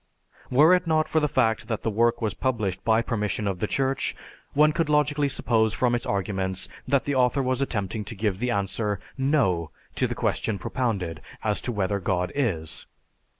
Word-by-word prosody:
Were 150 +7 +6
it 180 -1 +2
not 155 -1 +2
for 160 - +2
the 150 - +2
fact 115 -6 +1
that 110 -3 -3
the 110 - 0
work 115 +2 +2
was 105 -3 0
published 110 -8 -1
by 115 0 +3
permission 105 -3 -1
of 95 -3 -2
the 105 - 0
Church, 135 +2 0 0.4
one 150 +1 +5
could 165 -2 0
logically 145 -1 +2
suppose 110 -4 +1
from 125 -1 +2
its 120 - -1
arguments 95 -1 -1 0.2
that 140 -2 +2
the 145 - -1
author 130 +1 +2
was 130 +1 0
attempting 105 -4 -2
to 115 - -6
give 100 -2 -1
the 125 +2 -1
answer, 100 -1 -1 0.2
"No," 135 - +1 0.2
to - - +1
the - - -4
question 110 - -1
propounded, 95 - -2 0.2
as 105 -1 0
to 125 - -2
whether 100 -2 0
God 90 -1 -1
is. 85 - -2
115 Hz, 190 wpm, -26 LUFS, 100-135 Hz, 0.4 s, Were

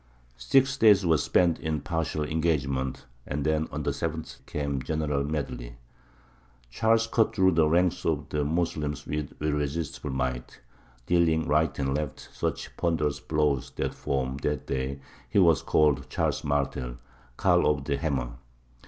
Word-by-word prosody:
Six 135 - +3
days 105 -6 +6
were 80 -3 +4
spent 85 +3 +2
in 80 -1 -2
partial 80 -1 -2
engagements, 70 -5 -1 0.2
and 70 0 -2
then 80 0 +1
on - - -4
the - - 0
seventh 80 -1 -5
came 70 -2 -2
a 65 - -4
general 75 -3 -1
medley. 65 -5 -4 1.0
Charles 115 - +3
cut 115 -1 +1
through 95 -2 +4
the 80 -2 +3
ranks 90 +2 +2
of 75 -3 -1
the 75 -1 0
Moslems 75 -1 -1
with 75 -1 -4
irresistible 75 0 -2
might, 65 -2 -3 0.5
dealing 80 -2 +2
right 75 -1 +2
and 70 -1 0
left 75 -1 -4
such - - -3
ponderous 80 -4 0
blows 75 -4 0
that - - -2
from 65 -1 -2
that 75 0 -2
day 65 +1 -3 0.3
he 105 - -1
was 85 -6 +5
called 70 -3 +2
Charles - - -1
Martel, 70 -4 -1 0.4
"Karl - - +3
of 75 -2 +1
the 70 0 -1
Hammer." 65 -7 -1
75 Hz, 150 wpm, -27 LUFS, 70-80 Hz, 1.0 s, days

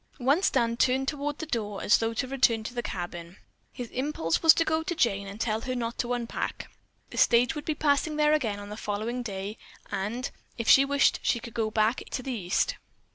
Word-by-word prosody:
Once 285 +8 +3
Dan 235 0 +1
turned 265 +2 +2
toward 290 0 -2
the 320 - -5
door 210 -8 -3
as - - +5
though 225 0 0
to 230 +3 -2
return 245 -4 +2
to 235 - -6
the 240 - -2
cabin. 175 -3 -6 0.3
His 245 -2 -7
impulse 255 - -1
was 325 - +9
to 330 - +2
go 315 0 +1
to 350 +2 -3
Jane 200 -10 +1
and 200 +2 -8
tell 220 -1 0
her 255 +1 -3
not 235 -1 -3
to 245 0 0
unpack. 240 -1 -4 0.4
The - - -4
stage 240 +1 +4
would 295 -2 -6
be 310 - -1
passing 295 +1 +1
there 300 0 +3
again 225 -9 0
on 205 0 -9
the 210 - -7
following 220 +4 -3
day, 200 -1 -5 0.3
and, 225 +6 -3 0.3
if 230 - -4
she 275 - +7
wished 280 0 +3
she 235 - +1
could 230 0 -10
go 220 -2 0
back 215 +2 +1
to 255 - -2
the 265 - -3
East. 205 - 0
240 Hz, 220 wpm, -28 LUFS, 215-280 Hz, 0.4 s, was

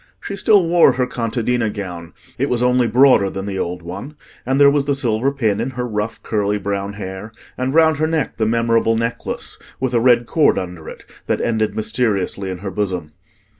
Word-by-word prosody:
She 200 - -6
still 200 -1 +4
wore 170 -5 +5
her 125 0 0
contadina 120 -1 -1
gown: 90 -5 -7 0.3
it 140 - 0
was 125 0 0
only 125 -1 +3
broader 120 -4 +5
than 95 0 -5
the 95 -2 -4
old 90 0 -4
one; 100 - -7 0.3
and 135 +1 +1
there 140 0 +7
was 140 -1 +1
the 140 -1 +1
silver 125 0 0
pin 110 -7 0
in 120 +3 -1
her 125 0 -2
rough 110 0 -4
curly 105 -1 0
brown 100 0 -3
hair, 100 +1 -7 0.2
and 130 +1 -2
round 160 -2 +5
her 155 +1 +1
neck 160 -3 -2
the 110 - +1
memorable 115 0 +2
necklace, 115 +1 -4 0.2
with 130 -1 -1
a 120 - +3
red 120 0 +4
cord 155 +4 +2
under 90 -3 -5
it, - - -12 0.2
that - - 0
ended 110 -2 0
mysteriously 105 -3 -1
in 95 - -4
her 95 - -3
bosom. 90 -7 -3
115 Hz, 200 wpm, -19 LUFS, 100-130 Hz, 0.3 s, there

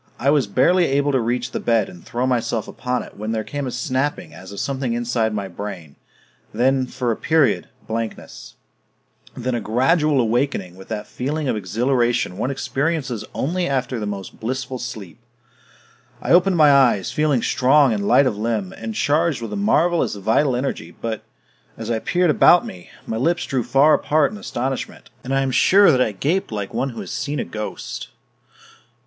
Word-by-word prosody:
I 140 +3 +2
was 145 -7 +2
barely 170 - +3
able 140 0 +1
to 135 - +2
reach 120 +1 -1
the - - -3
bed 115 -4 +1
and 90 -2 -13
throw 120 +2 -2
myself 120 -3 -1
upon 125 -1 -3
it - - -14
when 110 +2 -3
there 110 -1 -1
came 145 +3 -4
a - - -2
snapping 135 +7 -2
as 95 +1 -11
of 100 - -7
something 130 -3 -2
inside 120 -1 0
my 100 -2 -3
brain... 90 -5 -8 0.6
then, 130 +1 +1
for 125 -2 -2
a - - 0
period, 155 +1 +1 0.2
blankness... 115 0 -6 0.8
then 125 +1 -2
a 120 - -1
gradual 140 +6 +2
awakening 115 -6 0
with 95 +1 -13
that 105 -2 -4
feeling 145 +4 -3
of 125 - 0
exhilaration 120 0 0
one 125 - -1
experiences 135 -3 -2
only 175 +5 -1
after 130 -3 -1
the 105 - -3
most 100 -2 -6
blissful 130 +2 -4
sleep. 110 -5 -7 1.0
I - - -3
opened 180 +1 +5
my 150 -2 +7
eyes, 125 -9 +3
feeling 150 -6 +1
strong 135 0 +4
and 100 -1 -2
light 130 +4 +5
of 125 - 0
limb 105 -3 -2
and 110 -1 -6
charged 155 +1 +1
with 115 - -6
a - - -2
marvelous 175 - +2
vital 115 +7 +1
energy 125 -10 -3
but, 115 -2 -3 0.6
as 115 +1 -4
I 115 - 0
peered 175 +6 +2
about 175 +3 +5
me, 90 -1 -10 0.2
my 110 - -3
lips 165 +8 +1
drew 130 -2 -1
far 135 +6 +4
apart 150 +1 +2
in 210 - -8
astonishment, 130 -6 -4
and 130 - -6
I 135 0 +2
am 135 -1 0
sure 195 +8 +6
that 130 -3 +2
I 110 - +2
gaped 150 - -1
like 105 -2 -4
one 135 - -1
who 115 - -7
has - - -7
seen 150 0 -3
a - - -2
ghost. 105 - -6
125 Hz, 185 wpm, -21 LUFS, 110-145 Hz, 1.0 s, my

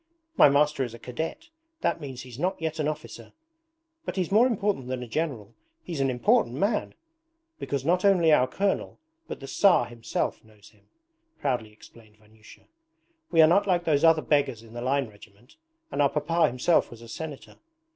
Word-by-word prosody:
'My 145 - +7
master 145 0 +2
is 120 -2 -6
a - - -10
cadet; 160 - -6 0.3
that 165 - 0
means 130 -4 -7
he's 125 0 -11
not 185 +4 -1
yet 160 -1 -3
an 150 - 0
officer, 155 0 -7 0.7
but - - -5
he's 185 -2 -2
more 225 +5 +5
important 205 - -1
than 130 -1 -4
a - - -8
general 115 -5 -3 0.3
he's 170 -5 -5
an 135 -1 +2
important 120 -1 +2
man! 205 - -1 0.6
Because 140 -1 -3
not 180 +3 +2
only 180 -5 +4
our 130 -3 +4
colonel, 195 +8 -2 0.3
but - - -7
the - - -7
Tsar 180 -2 +3
himself, 120 -1 -4
knows 110 -2 -19
him,' 105 -2 -28 0.5
proudly 125 -6 -2
explained 110 0 -18
Vanyusha. 110 0 -19 0.7
'We 165 -2 +6
are - - +7
not 195 +5 +3
like 175 -2 +2
those 155 -3 +1
other 160 -1 +5
beggars 140 -6 0
in 115 0 -15
the 120 - -6
line 135 +1 0
regiment, 105 +3 -18 0.3
and - - 0
our 140 - +4
papa 160 +4 +1
himself 125 +7 +1
was 120 0 -12
a - - -11
Senator. 145 +4 -8
140 Hz, 185 wpm, -26 LUFS, 120-165 Hz, 0.7 s, My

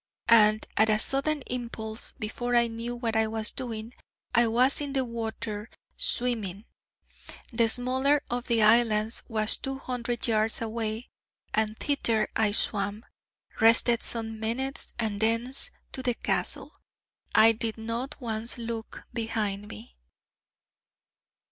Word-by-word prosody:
And 215 -1 +6
at 220 +1 +5
a 215 - +4
sudden 275 +5 +2
impulse, 230 -3 -6
before 240 +2 -2
I 235 0 +5
knew 230 +1 -4
what 235 -2 -2
I 220 0 +3
was 220 0 -1
doing, 230 -2 -5 0.4
I 235 0 +4
was 250 +6 +3
in 285 -1 -3
the 265 -2 +1
water 225 -2 -5 0.3
swimming. 220 -5 -1 0.9
The 230 -1 +3
smaller 260 +4 +2
of 245 0 -3
the 230 -2 +3
islands 220 0 +3
was 215 -2 +2
two 270 0 -4
hundred 245 -2 -3
yards 220 0 +2
away, 225 0 -4 0.4
and 215 0 0
thither 230 -7 +1
I 215 -2 +2
swam, 205 +1 -1 0.5
rested 230 +1 +5
some 225 -1 -3
minutes, 260 +5 -1
and 215 -3 -2
thence 230 +5 +1 0.2
to 260 - -5
the 245 -2 0
Castle. - - -1 0.6
I 225 +1 +8
did 225 0 -2
not 230 +6 -4
once 230 -1 -2
look 230 -1 -6
behind 215 -3 -2
me. 105 - -11
230 Hz, 130 wpm, -28 LUFS, 220-245 Hz, 0.9 s, I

